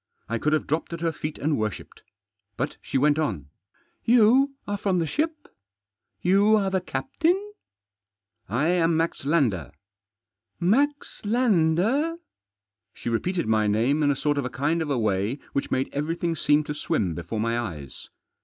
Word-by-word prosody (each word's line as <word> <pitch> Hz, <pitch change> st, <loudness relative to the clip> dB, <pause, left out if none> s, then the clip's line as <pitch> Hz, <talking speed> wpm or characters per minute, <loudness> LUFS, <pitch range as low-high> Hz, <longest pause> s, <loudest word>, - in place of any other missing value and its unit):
I 115 Hz, +1 st, -2 dB
could 150 Hz, -, +1 dB
have 155 Hz, -, +1 dB
dropped 160 Hz, +3 st, -2 dB
at 170 Hz, -, -5 dB
her 165 Hz, -1 st, +1 dB
feet 150 Hz, 0 st, -5 dB
and 150 Hz, -2 st, 0 dB
worshipped. 110 Hz, -2 st, -5 dB, 0.6 s
But 140 Hz, +4 st, -3 dB
she -, -, -2 dB
went 145 Hz, +3 st, +3 dB
on: 95 Hz, -, -2 dB, 0.3 s
" -, -, -40 dB
You 255 Hz, +4 st, +5 dB
are 205 Hz, -, -1 dB
from 190 Hz, -2 st, +1 dB
the 170 Hz, -, +1 dB
ship? 305 Hz, -, -2 dB, 0.8 s
You 200 Hz, +4 st, +5 dB
are 195 Hz, -2 st, +1 dB
the 190 Hz, -1 st, +1 dB
captain? 345 Hz, -, -1 dB, 0.3 s
" 100 Hz, 0 st, -66 dB
" 115 Hz, +4 st, -42 dB
I 160 Hz, -, +2 dB
am 170 Hz, -2 st, +2 dB
Max 165 Hz, -4 st, -1 dB
Lander." 140 Hz, -, +1 dB, 0.5 s
" 100 Hz, +3 st, -57 dB, 0.2 s
Max 290 Hz, +2 st, -1 dB
Lander? 220 Hz, -, +2 dB, 0.4 s
" 100 Hz, -1 st, -62 dB
She -, -, -5 dB
repeated 175 Hz, +10 st, -1 dB
my 110 Hz, -1 st, +2 dB
name 120 Hz, +9 st, +2 dB
in 145 Hz, -, +3 dB
a 140 Hz, -, +2 dB
sort 145 Hz, +1 st, 0 dB
of 140 Hz, -, -2 dB
a -, -, -2 dB
kind 150 Hz, +6 st, 0 dB
of 155 Hz, -, -2 dB
a 140 Hz, -, +1 dB
way 105 Hz, +2 st, 0 dB, 0.2 s
which 140 Hz, -, -1 dB
made 130 Hz, +1 st, 0 dB
everything 165 Hz, +3 st, -1 dB
seem 150 Hz, 0 st, +3 dB
to 150 Hz, -, -4 dB
swim 100 Hz, -, -1 dB
before 85 Hz, +7 st, -5 dB
my 115 Hz, +2 st, 0 dB
eyes. 80 Hz, -, -7 dB
150 Hz, 180 wpm, -25 LUFS, 115-185 Hz, 0.8 s, You